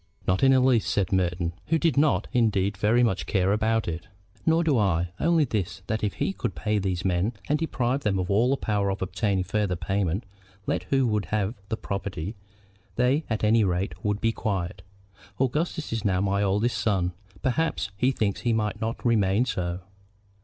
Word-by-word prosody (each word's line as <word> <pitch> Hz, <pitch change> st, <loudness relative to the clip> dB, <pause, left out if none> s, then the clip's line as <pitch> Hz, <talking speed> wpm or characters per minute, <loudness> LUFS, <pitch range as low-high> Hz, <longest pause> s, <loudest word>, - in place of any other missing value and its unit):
"Not 95 Hz, 0 st, +1 dB
in 135 Hz, -, +6 dB
the 130 Hz, -, +5 dB
least," 125 Hz, -3 st, +3 dB
said 100 Hz, 0 st, 0 dB
Merton, 85 Hz, -2 st, 0 dB
who 165 Hz, -, +3 dB
did 160 Hz, -4 st, +1 dB
not, 145 Hz, +1 st, +2 dB
indeed, 105 Hz, -5 st, +2 dB
very 110 Hz, +5 st, +3 dB
much 95 Hz, -6 st, 0 dB
care 95 Hz, -1 st, +2 dB
about 110 Hz, +1 st, +1 dB
it. 85 Hz, +3 st, -4 dB, 0.4 s
"Nor 165 Hz, +1 st, +4 dB
do 155 Hz, -4 st, +2 dB
I; 90 Hz, -4 st, +1 dB
only 165 Hz, -2 st, +3 dB
this, 95 Hz, -5 st, -3 dB
that 110 Hz, +1 st, -2 dB
if 105 Hz, -, 0 dB
he 95 Hz, -, -1 dB
could 95 Hz, -2 st, -3 dB
pay 105 Hz, +5 st, 0 dB
these 95 Hz, -1 st, -2 dB
men 95 Hz, +5 st, +1 dB
and 150 Hz, +1 st, +1 dB
deprive 135 Hz, -4 st, 0 dB
them 105 Hz, -5 st, 0 dB
of 90 Hz, +1 st, -1 dB
all 120 Hz, +7 st, +3 dB
power 105 Hz, -5 st, 0 dB
of 95 Hz, 0 st, -2 dB
obtaining 95 Hz, 0 st, 0 dB
farther 100 Hz, 0 st, 0 dB
payment, 95 Hz, +2 st, -1 dB, 0.4 s
let -, -, -1 dB
who 135 Hz, -1 st, +2 dB
would 105 Hz, -3 st, 0 dB
have 105 Hz, 0 st, -1 dB, 0.2 s
the 110 Hz, -, -1 dB
property, 100 Hz, -1 st, -4 dB, 0.6 s
they 130 Hz, +6 st, +2 dB
at 110 Hz, -2 st, -2 dB
any 110 Hz, +1 st, +4 dB
rate 95 Hz, +1 st, 0 dB
would 105 Hz, -1 st, 0 dB
be 115 Hz, +1 st, +2 dB
quiet. 95 Hz, -5 st, -3 dB, 0.6 s
Augustus 150 Hz, +3 st, -1 dB
is 115 Hz, -2 st, -2 dB
now 95 Hz, -3 st, +1 dB
my 100 Hz, +1 st, +1 dB
eldest 105 Hz, +4 st, +1 dB
son. 95 Hz, -5 st, +1 dB, 0.3 s
Perhaps 130 Hz, -5 st, 0 dB
he 125 Hz, +6 st, +2 dB
thinks 105 Hz, -7 st, -1 dB
he 120 Hz, -, +1 dB
might 110 Hz, 0 st, -1 dB
not 115 Hz, +2 st, -3 dB
remain 110 Hz, -1 st, +3 dB
so. 90 Hz, -5 st, -2 dB
105 Hz, 190 wpm, -26 LUFS, 95-120 Hz, 0.6 s, in